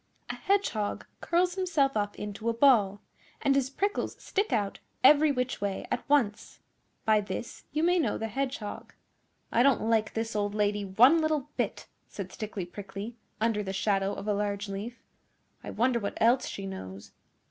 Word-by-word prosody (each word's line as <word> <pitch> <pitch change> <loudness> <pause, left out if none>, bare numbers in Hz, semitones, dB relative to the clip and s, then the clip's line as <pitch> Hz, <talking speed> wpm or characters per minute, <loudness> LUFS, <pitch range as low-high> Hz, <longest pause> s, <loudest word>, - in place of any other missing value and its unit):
A - - -6
Hedgehog 380 - 0
curls 355 +1 +1
himself 335 -8 +1
up 205 -1 -1
into 210 +2 -4
a 230 - 0
ball 220 -6 +4 0.4
and 275 - +2
his 270 -1 +1
prickles 400 +9 -2
stick 405 -3 -1
out 205 -5 0 0.2
every 295 +3 +7
which 250 -4 -2
way 200 -1 -2
at - - -3
once. 240 -8 +1 0.5
By 215 -1 +4
this 210 +3 -6
you 305 +3 0
may 355 +1 +4
know 320 - 0
the 225 - -3
Hedgehog.' 255 -3 -4 0.6
'I 235 - +3
don't 270 -1 +4
like 215 -2 +1
this 225 0 -2
old 205 0 -1
lady 205 -1 +1
one 245 - +5
little 305 -2 -1
bit,' - - -2 0.2
said - - -7
Stickly 210 -5 -5
Prickly, 200 +4 -7 0.2
under 220 -1 +1
the 190 -2 -4
shadow 195 0 0
of 195 - -7
a 210 - +2
large 205 0 -2
leaf. 205 +5 -6 0.6
'I - - -6
wonder 240 +1 +1
what 200 -2 -4
else 240 +3 +4
she 195 - -5
knows? 100 - -8
225 Hz, 170 wpm, -29 LUFS, 205-275 Hz, 0.6 s, every